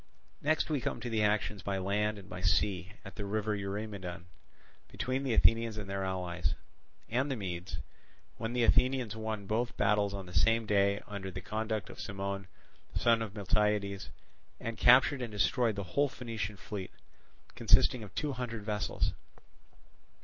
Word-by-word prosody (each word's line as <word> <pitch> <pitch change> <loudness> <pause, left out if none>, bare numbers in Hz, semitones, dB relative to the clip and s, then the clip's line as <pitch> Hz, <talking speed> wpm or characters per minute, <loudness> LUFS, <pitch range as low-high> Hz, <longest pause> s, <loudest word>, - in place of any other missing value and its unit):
Next 155 +2 +2
we 150 -4 0
come - - -2
to 120 - -4
the 110 -1 +2
actions 105 -1 +1
by 100 +1 -1
land 105 +3 0
and 100 -1 -11
by 90 -2 -6
sea 95 0 +1
at 100 - -10
the 105 - -3
river 105 +1 0
Eurymedon, 100 -3 -4 0.6
between 130 +1 -2
the 130 -4 0
Athenians 115 -1 +4
with 105 - -4
their 95 0 -2
allies, 90 -2 -1 0.5
and 130 +5 0
the 135 - 0
Medes, 90 -4 -4 0.6
when 115 +1 -3
the 125 -1 +2
Athenians 125 -2 +3
won 110 -2 -3
both 115 +4 -1
battles 100 0 +2
on 95 -1 -5
the 90 - -11
same 115 +8 +3
day 100 -1 +3
under 100 -2 -5
the 90 0 -5
conduct 110 +2 -3
of - - -12
Cimon, 100 -2 -4 0.5
son 115 -1 +4
of 110 -2 -4
Miltiades, 100 -1 +1 0.5
and 115 0 -4
captured 130 +3 +6
and 120 -3 -3
destroyed 110 +2 +2
the 100 - -3
whole 145 0 +3
Phoenician 110 -6 -4
fleet, 100 -2 -6 0.6
consisting 125 - +4
of 100 -4 -10
two 150 -1 0
hundred 115 -4 -4
vessels. 105 -1 -1
105 Hz, 165 wpm, -32 LUFS, 100-115 Hz, 0.6 s, captured